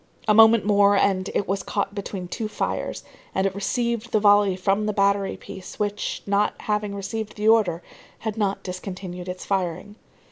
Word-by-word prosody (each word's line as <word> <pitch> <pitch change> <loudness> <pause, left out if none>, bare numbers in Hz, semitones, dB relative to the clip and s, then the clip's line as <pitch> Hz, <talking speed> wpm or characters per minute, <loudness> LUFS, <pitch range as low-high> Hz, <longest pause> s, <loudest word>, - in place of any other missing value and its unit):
A 210 - +5
moment 225 0 +7
more, 205 -1 +4
and 195 -1 +1
it 200 - 0
was 195 +1 -1
caught 200 -1 -2
between 195 -3 -5
two 220 +5 -4
fires, 215 - -3 0.3
and 190 - +1
it 195 - 0
received 235 +3 -2
the 215 - +3
volley 205 -2 +5
from 195 +3 0
the 215 - 0
battery 200 0 +1
piece 190 -1 -10
which, 205 0 -2
not 205 +1 +1
having 210 -1 -1
received 215 +2 -5
the 210 0 -1
order, 195 -7 +3 0.3
had 220 -2 -4
not 200 -3 -1
discontinued 180 -1 -6
its 180 0 -6
firing. 190 +1 -2
200 Hz, 175 wpm, -24 LUFS, 190-210 Hz, 0.3 s, moment